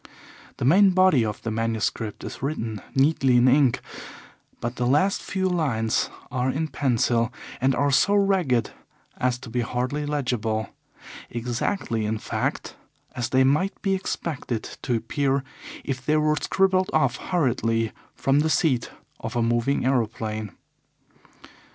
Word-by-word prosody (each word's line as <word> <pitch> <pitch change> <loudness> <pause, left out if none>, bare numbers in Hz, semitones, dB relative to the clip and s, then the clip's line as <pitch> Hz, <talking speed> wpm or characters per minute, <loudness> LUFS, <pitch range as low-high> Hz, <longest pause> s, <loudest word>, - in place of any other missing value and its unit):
The - - -2
main 190 +8 +6
body 185 -10 +5
of 105 -2 -4
the 115 - -2
manuscript 110 -1 -2
is - - -7
written 115 -7 -3
neatly 135 -2 +3
in 120 +1 +5
ink, 135 -1 +4 0.8
but 120 +1 -4
the 125 - 0
last 150 +10 +2
few 190 -1 -1
lines 135 -11 0 0.2
are 125 0 0
in 155 +4 -1
pencil 120 -4 +1 0.3
and 130 0 +3
are 145 +1 +2
so 200 +9 +4
ragged 185 - +2 0.5
as 125 -1 0
to 125 -1 -10
be 125 +1 0
hardly 130 +5 -2
legible 115 -7 -1 0.6
exactly, 120 - -2
in 110 +1 -1
fact, - - -3 0.4
as 125 -1 -2
they 130 0 +4
might 150 +9 +1
be 195 -2 +2
expected 155 - -3 0.2
to 125 - 0
appear 135 +3 0 0.4
if 130 -2 -4
they 155 +2 +2
were 155 0 +2
scribbled 190 +3 +1
off 135 -5 +2
hurriedly 115 -9 0 0.2
from 135 +1 +2
the 155 +2 +2
seat 135 -7 +1 0.3
of 115 +2 -6
a 120 - +2
moving 120 +4 +1
aeroplane. 110 -4 -1
130 Hz, 140 wpm, -25 LUFS, 115-150 Hz, 0.8 s, main